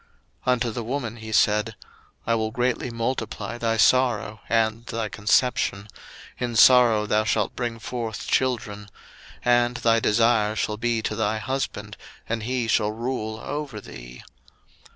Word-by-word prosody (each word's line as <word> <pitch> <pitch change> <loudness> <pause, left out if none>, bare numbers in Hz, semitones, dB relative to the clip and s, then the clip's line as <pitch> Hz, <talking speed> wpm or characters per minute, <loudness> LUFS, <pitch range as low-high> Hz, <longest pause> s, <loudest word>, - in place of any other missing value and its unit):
01:003:016 - - +5
Unto 120 -1 -1
the 120 +1 -4
woman 120 -1 -3
he 110 -1 -8
said, 105 -1 +2 0.5
I 115 - +1
will 110 -1 0
greatly 125 +2 -1
multiply 115 0 -3
thy 115 -1 0
sorrow 110 -2 +2
and 115 0 +1
thy 115 -2 -3
conception; 105 +1 +1 0.5
in 120 -2 -3
sorrow 115 -2 +6
thou 105 0 +2
shalt 110 -1 0
bring 120 -2 -3
forth 115 -1 -5
children; 105 -5 -1 0.6
and 120 0 +3
thy 115 -1 +3
desire 110 -1 +2
shall 105 -1 -2
be 115 0 -1
to 110 - -2
thy 110 0 0
husband, 110 -4 -4 0.3
and 115 0 -2
he 125 +1 -2
shall 105 -1 +2
rule 110 -1 -4
over 145 -7 -5
thee. - - -11
115 Hz, 145 wpm, -24 LUFS, 110-120 Hz, 0.6 s, sorrow